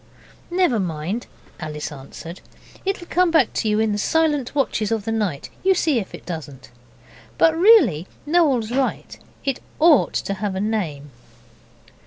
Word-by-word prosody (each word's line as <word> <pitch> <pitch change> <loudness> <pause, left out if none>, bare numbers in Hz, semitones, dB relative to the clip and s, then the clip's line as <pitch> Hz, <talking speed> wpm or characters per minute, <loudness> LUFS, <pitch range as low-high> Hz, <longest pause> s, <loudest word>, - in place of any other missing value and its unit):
'Never 350 -10 +2
mind,' 180 +5 -3 0.3
Alice 150 -1 -5
answered, 150 +5 -10 0.4
'it'll 385 -2 -2
come 360 +1 +2
back 320 -8 +3
to 220 - 0
you 210 0 +2
in 220 -1 +2
the 205 - -1
silent 295 -1 +1
watches 225 -7 0
of 220 -3 -1
the 225 - -2
night; 200 -10 -2
you 380 0 +4
see 310 -8 +2
if 195 - -7
it - - -14
doesn't. 145 -6 -8 0.7
But 325 -1 +4
really, 325 - +5 0.2
Noel's 290 -9 +2
right, 265 +1 -1 0.3
it 270 -2 -1 0.2
OUGHT 310 -4 +5
to 200 - -1
have 195 -1 -3
a - - -2
name. 175 -10 -2
220 Hz, 155 wpm, -22 LUFS, -, 0.7 s, really